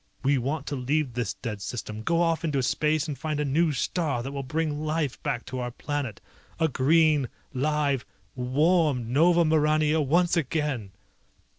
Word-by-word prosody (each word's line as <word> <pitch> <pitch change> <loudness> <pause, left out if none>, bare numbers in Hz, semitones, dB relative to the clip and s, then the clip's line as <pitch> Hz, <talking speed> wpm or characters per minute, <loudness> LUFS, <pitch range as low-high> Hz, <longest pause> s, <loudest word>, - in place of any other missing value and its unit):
We 140 0 +3
want 140 +4 -2
to 145 - -3
leave 135 +1 -1
this 120 -4 -2
dead 105 -5 -5
system, 110 0 -5
go 170 +9 +2
off 165 -1 0
into 145 -5 0
space 155 +4 +1
and 150 - -3
find 150 +2 -3
a 150 - 0
new 155 +4 +2
star 145 -3 -1
that 135 - -5
will 140 0 -4
bring 150 +2 -2
life 155 -3 -1
back 120 - -2
to 130 - -5
our 125 -1 -2
planet! 130 -3 -4 0.4
A 160 - +3
green, 150 0 +3 0.2
live, 140 -1 0 0.3
warm 135 -1 +1
Nova 170 +4 +5
Maurania 155 0 +3
once 175 +6 +2
again!" 150 - -1
145 Hz, 165 wpm, -26 LUFS, 130-155 Hz, 0.4 s, Nova